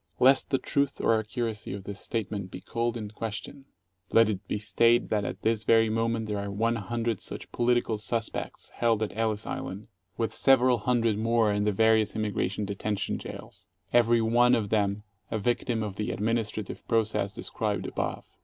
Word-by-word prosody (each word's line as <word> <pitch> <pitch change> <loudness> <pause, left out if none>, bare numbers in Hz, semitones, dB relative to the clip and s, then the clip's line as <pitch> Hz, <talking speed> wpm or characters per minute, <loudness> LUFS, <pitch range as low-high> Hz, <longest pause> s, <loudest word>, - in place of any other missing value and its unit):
Lest 130 +1 +5
the 135 - +2
truth 140 +1 -1
or 115 -1 +3
accuracy 110 -2 -4
of 100 -1 -6
this 100 0 -7
statement 105 -4 -3
be 90 - -8
called 120 +4 -2
in 105 -2 -6
question, 115 +5 -6 0.5
let 115 -1 +5
it 100 -2 -4
be - - -1
stated 115 +3 +3
that 105 -1 +1
at - - -5
this 110 -1 +1
very 115 -1 +4
moment 115 0 0
there 105 -1 -2
are 100 0 -4
one 115 +4 0
hundred 115 +1 -2
such - - -6
"political 120 -2 +1
suspects" 115 +1 -3
held 115 -2 +2
at 105 - -4
Ellis 110 -1 -1
Island, 100 +4 -5 0.3
with 115 -2 -1
several 130 -2 +4
hundred 115 -2 +1
more 115 -1 +2
in 105 0 0
the 105 - +3
various 110 +1 +3
Immigration 105 -1 -1
Detention 100 +1 -2
jails, - - -10 0.3
every 120 -1 +4
one 120 +2 +4
of 105 -3 -1
them 105 -1 +1 0.3
a 110 - -1
victim 115 +1 0
of 100 -2 -5
the 105 - -2
administrative 110 -1 -2
process 110 -3 +1
described - - -3
above. - - -3
110 Hz, 175 wpm, -28 LUFS, 105-115 Hz, 0.5 s, Lest